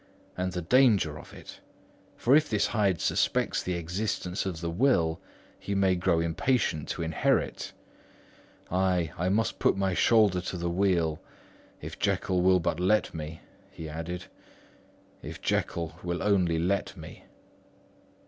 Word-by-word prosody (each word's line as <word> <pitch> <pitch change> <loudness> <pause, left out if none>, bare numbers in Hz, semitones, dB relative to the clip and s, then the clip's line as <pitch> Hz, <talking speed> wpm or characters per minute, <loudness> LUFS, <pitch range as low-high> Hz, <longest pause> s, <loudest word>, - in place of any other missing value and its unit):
And 90 0 -2
the 90 -1 -4
danger 100 - +3
of - - -13
it; - - -12 0.6
for 130 +4 +4
if 155 0 +3
this 105 -2 +1
Hyde 100 -7 +1
suspects - - +1
the 90 - -2
existence 90 +2 -3
of 90 -4 -4
the 85 0 -3
will, 85 -6 +2 0.4
he 100 - -4
may 95 -1 +3
grow 90 -1 +1
impatient 85 - 0
to - - -3
inherit. 80 0 0 1.0
Ay, 90 -3 +1
I 90 +2 -1
must 110 +4 0
put - - +2
my 95 -1 0
shoulders 100 -5 +3
to 90 - -4
the 85 0 -2
wheel—if 85 -4 -3
Jekyll 90 -1 0
will 95 0 +4
but 85 -1 -1
let 105 +4 +2
me," 80 0 -7 0.3
he 80 - -8
added, 80 +3 -5 1.0
"if - - -8
Jekyll 85 0 -2
will 85 0 -3
only 90 -5 +2
let 90 +4 -1
me." - - -11
90 Hz, 140 wpm, -28 LUFS, 85-100 Hz, 1.0 s, for